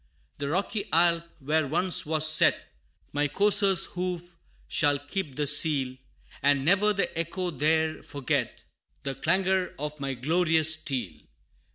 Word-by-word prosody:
The 140 Hz, -1 st, -3 dB
rocky 195 Hz, +5 st, -1 dB
Alp, 170 Hz, 0 st, +3 dB
where 155 Hz, +1 st, 0 dB
once 180 Hz, +3 st, +2 dB
was 155 Hz, 0 st, +1 dB
set 155 Hz, 0 st, +4 dB, 0.5 s
My 145 Hz, 0 st, +1 dB
courser's 195 Hz, +3 st, +3 dB
hoof, 180 Hz, -1 st, -5 dB, 0.3 s
shall 145 Hz, -4 st, +2 dB
keep 145 Hz, +1 st, -5 dB
the 150 Hz, -, -1 dB
seal, 140 Hz, -3 st, +2 dB, 0.5 s
And 140 Hz, -1 st, +2 dB
ne'er 200 Hz, +5 st, +3 dB
the 200 Hz, -1 st, -2 dB
echo 175 Hz, +2 st, -3 dB
there 160 Hz, +1 st, 0 dB
forget 140 Hz, -3 st, -3 dB, 0.4 s
The 135 Hz, -, -2 dB
clangor 185 Hz, +5 st, 0 dB
of 150 Hz, +1 st, -5 dB
my 135 Hz, -1 st, -3 dB
glorious 160 Hz, +3 st, +2 dB
steel. 125 Hz, -, -4 dB
160 Hz, 135 wpm, -27 LUFS, 145-180 Hz, 0.5 s, set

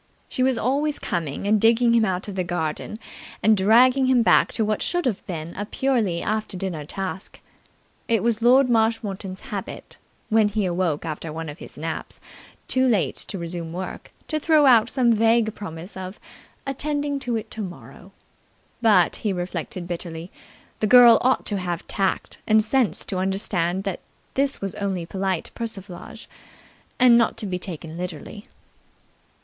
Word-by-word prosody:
She -, -, -3 dB
was 260 Hz, -1 st, +3 dB
always 285 Hz, +6 st, 0 dB
coming 165 Hz, -1 st, -3 dB
and 210 Hz, 0 st, +3 dB
digging 235 Hz, +1 st, +4 dB
him 230 Hz, -1 st, +4 dB
out 185 Hz, -1 st, -2 dB
of 205 Hz, -, -5 dB
the 185 Hz, -1 st, -1 dB
garden 170 Hz, +3 st, -3 dB, 0.5 s
and 220 Hz, 0 st, +5 dB
dragging 250 Hz, +7 st, +4 dB
him 255 Hz, -2 st, +4 dB
back -, -, +4 dB
to 220 Hz, -, +1 dB
what 215 Hz, 0 st, -1 dB
should 350 Hz, -1 st, 0 dB
have 230 Hz, -7 st, -1 dB
been 170 Hz, -2 st, -5 dB
a 205 Hz, -, -3 dB
purely 220 Hz, -10 st, 0 dB
after 215 Hz, -2 st, -2 dB
dinner 180 Hz, -6 st, -4 dB
task. 190 Hz, +3 st, -5 dB, 0.7 s
It 230 Hz, -2 st, +1 dB
was 230 Hz, -1 st, +1 dB
Lord 255 Hz, +3 st, +5 dB
Marshmoreton's 220 Hz, -5 st, -1 dB
habit, -, -, -7 dB, 0.3 s
when 220 Hz, -1 st, +4 dB
he 205 Hz, -1 st, -1 dB
awoke 175 Hz, -4 st, -1 dB
after 160 Hz, 0 st, -5 dB
one 160 Hz, 0 st, -5 dB
of 150 Hz, -, -9 dB
his -, -, -11 dB
naps -, -, -5 dB, 0.5 s
too 260 Hz, 0 st, +2 dB
late 220 Hz, -7 st, +1 dB
to 195 Hz, -, -4 dB
resume 170 Hz, -1 st, -5 dB
work, 185 Hz, +1 st, -6 dB, 0.2 s
to 310 Hz, -, -1 dB
throw 310 Hz, -1 st, +4 dB
out 235 Hz, -3 st, +6 dB
some 245 Hz, -4 st, +3 dB
vague 225 Hz, 0 st, +3 dB
promise 175 Hz, -2 st, -8 dB
of 190 Hz, +1 st, -7 dB, 0.5 s
"attending 285 Hz, +1 st, -2 dB
to 245 Hz, -3 st, -2 dB
it 220 Hz, -, -5 dB
tomorrow"; 175 Hz, -, -8 dB, 0.7 s
but, 205 Hz, -7 st, +4 dB
he 210 Hz, -, -2 dB
reflected 175 Hz, -1 st, -4 dB
bitterly, 170 Hz, 0 st, -6 dB, 0.5 s
the 215 Hz, -, +1 dB
girl 240 Hz, 0 st, +8 dB
ought 260 Hz, +1 st, +2 dB
to 205 Hz, -2 st, -1 dB
have 175 Hz, -2 st, -4 dB
tact 195 Hz, -2 st, -1 dB
and 215 Hz, 0 st, +5 dB
sense 245 Hz, +1 st, +2 dB
to 190 Hz, -, -3 dB
understand 190 Hz, -1 st, 0 dB
that 195 Hz, -3 st, -3 dB, 0.3 s
this 275 Hz, 0 st, 0 dB
was 195 Hz, -2 st, -3 dB
only 190 Hz, -4 st, -3 dB
polite 190 Hz, 0 st, -2 dB
persiflage, 215 Hz, -2 st, -8 dB, 0.7 s
and 245 Hz, -2 st, +6 dB
not 230 Hz, -, +1 dB
to 225 Hz, -, -3 dB
be 180 Hz, -2 st, -3 dB
taken 165 Hz, -3 st, -6 dB
literally. 180 Hz, +4 st, -7 dB
205 Hz, 165 wpm, -23 LUFS, 180-235 Hz, 0.7 s, girl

